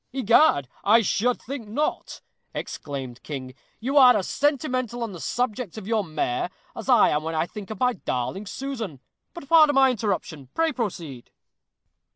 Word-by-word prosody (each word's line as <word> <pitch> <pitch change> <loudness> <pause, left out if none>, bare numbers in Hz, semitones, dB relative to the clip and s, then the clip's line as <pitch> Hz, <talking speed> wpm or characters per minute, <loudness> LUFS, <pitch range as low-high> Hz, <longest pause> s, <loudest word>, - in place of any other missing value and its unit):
"Egad! 235 - +4 0.2
I 225 +3 +5
should 220 +5 +1
think 255 -3 -7
not," 285 +9 -3 0.3
exclaimed 130 -4 -6
King; 130 -3 -6 0.3
"you 270 +5 -1
are 250 -4 +8
as 190 - -2
sentimental 255 -5 0
on 225 - -4
the 180 - -9
subject 245 -1 -2
of 215 - -7
your 220 0 +1
mare, 155 -7 -2 0.3
as - - -7
I - - +6
am 150 - +1
when 160 +1 -4
I 155 - +1
think 200 +2 -9
of 220 - -6
my 250 -1 +3
darling 185 - -3
Susan. 230 - -5 0.4
But 340 -5 -9
pardon 310 -2 +6
my 265 -1 +6
interruption. 185 - -3
Pray 325 -1 +2
proceed." 170 - -5
220 Hz, 165 wpm, -25 LUFS, 160-255 Hz, 0.4 s, are